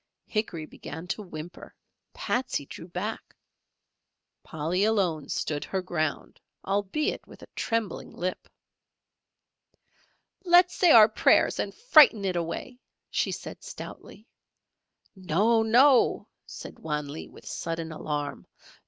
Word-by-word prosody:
Hickory 195 -8 -3
began 160 +2 -9
to 210 - -2
whimper, 175 -3 -10 0.4
Patsey 245 - -2
drew 165 - -10
back, 185 +5 -5 1.1
Polly 165 +5 -2
alone 190 -9 +1
stood 145 -2 -2
her 190 -1 -3
ground, 155 -4 -3 0.2
albeit 200 +9 -1
with - - -14
a - - -12
trembling 225 -3 -2
lip. 185 +1 -4 2.0
"Let's 355 0 +5
say 355 - +3
our 220 -7 +9
prayers 220 - +3
and - - -1
frighten 305 - +5
it 185 -2 -1
away," 175 +9 -4 0.3
she - - 0
said, - - -7
stoutly. 215 +4 -10 0.9
"No! 195 +6 +2
No!" 245 +4 +4 0.2
said - - -10
Wan 150 -2 -3
Lee, 145 +3 -7
with - - -16
sudden 165 -1 -4
alarm. 145 -2 -4
190 Hz, 115 wpm, -27 LUFS, 160-225 Hz, 2.0 s, our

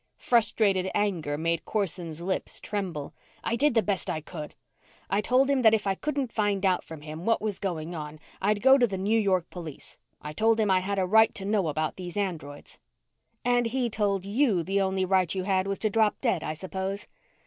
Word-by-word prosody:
Frustrated 205 -5 +2
anger 170 -8 0
made 165 +1 -1
Corson's 170 -6 -3
lips 185 +2 -2
tremble. 185 -8 -4 0.3
"I 230 - 0
did 275 +1 +2
the 225 - +4
best 200 -3 -1
I 155 - -1
could! 155 -1 -8 0.6
I 200 - +2
told 255 +5 +3
him 275 -2 +2
that 220 -2 +6
if 215 - -3
I 195 - +2
couldn't 275 +2 -2
find 205 -2 0
out 185 -1 +2
from 160 -2 -10
him 155 +2 -8
what 225 +3 +2
was 210 -3 -3
going 170 -3 -3
on, 155 -1 -7 0.2
I'd 205 +2 +1
go 265 +1 +7
to 240 - +4
the 195 -3 -4
New 210 +4 +2
York 185 -5 +1
police. 165 -5 -9 0.2
I 150 - -7
told 225 +6 +2
him 210 -3 +2
I 185 - +4
had 200 +2 -2
a 190 - +2
right 220 +4 +5
to 195 - -3
know 200 -4 +1
about 155 +1 -2
these 180 0 -7
androids." 160 -8 -4 0.7
"And 245 -1 +3
he 245 0 -1
told 200 -3 0
you 210 -4 +2
the 195 +3 0
only 190 0 0
right 185 -2 +2
you 185 - -1
had 190 0 +1
was 195 0 -1
to 215 - 0
drop 220 0 +2
dead, 230 - 0
I 155 - -3
suppose." 190 +3 -4
195 Hz, 210 wpm, -27 LUFS, 175-220 Hz, 0.7 s, go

